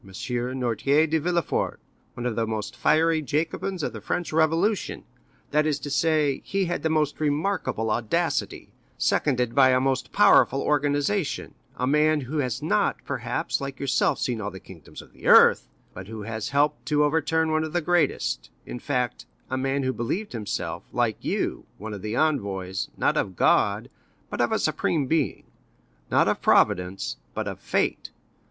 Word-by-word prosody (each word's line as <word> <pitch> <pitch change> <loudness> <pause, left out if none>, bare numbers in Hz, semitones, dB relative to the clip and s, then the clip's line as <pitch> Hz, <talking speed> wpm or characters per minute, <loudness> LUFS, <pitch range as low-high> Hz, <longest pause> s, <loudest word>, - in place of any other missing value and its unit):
Noirtier 125 - 0
de 160 +1 +1
Villefort, 170 +2 -1 0.4
one 120 - -5
of 120 -3 -1
the 115 0 0
most 110 -2 -4
fiery 160 +1 +2
Jacobins 160 +5 -2
of - - -2
the - - -8
French 175 -3 -3
Revolution; 165 +6 +1 0.5
that 150 +1 +2
is 150 -2 +1
to 145 0 -7
say, 150 -2 +1
he 195 -1 -1
had 175 0 -2
the 160 - 0
most 155 -2 0
remarkable 150 - -1
audacity, 110 0 -1 0.3
seconded 125 -5 +1
by 135 -2 +6
a 130 0 +4
most 130 0 -1
powerful 135 - +5
organization—a 145 -1 -1
man 150 +2 +3
who 140 +4 -3
has 125 -5 -2
not, - - +1
perhaps, - - -2
like 135 -1 -6
yourself 140 -2 +1
seen 120 -3 -2
all 105 - -3
the 95 - -10
kingdoms 85 -6 -12
of - - -21
the - - -8
earth, - - +7 0.3
but 95 +1 -9
who 110 -1 -7
has 110 +1 -4
helped 145 -1 +1
to 150 0 +3
overturn 160 +1 +1
one 155 0 +1
of 160 - -4
the 175 - +2
greatest; 175 - 0 0.2
in 125 - -6
fact, 125 -2 -2 0.2
a - - 0
man 135 +1 -1
who 130 0 0
believed 170 - -3
himself, 105 -5 -4
like - - -1
you, - - -2
one 110 +2 -7
of 100 - -7
the 110 +3 -3
envoys, 100 -11 -1
not - - +1
of 95 - -1
God, - - +2 0.4
but - - -2
of - - +1
a - - +2
supreme 150 -5 0
being; 150 0 0 0.7
not - - +3
of - - 0
Providence, 90 +2 +2 0.2
but - - -3
of - - -5
fate. - - -1
140 Hz, 170 wpm, -25 LUFS, 120-155 Hz, 0.7 s, earth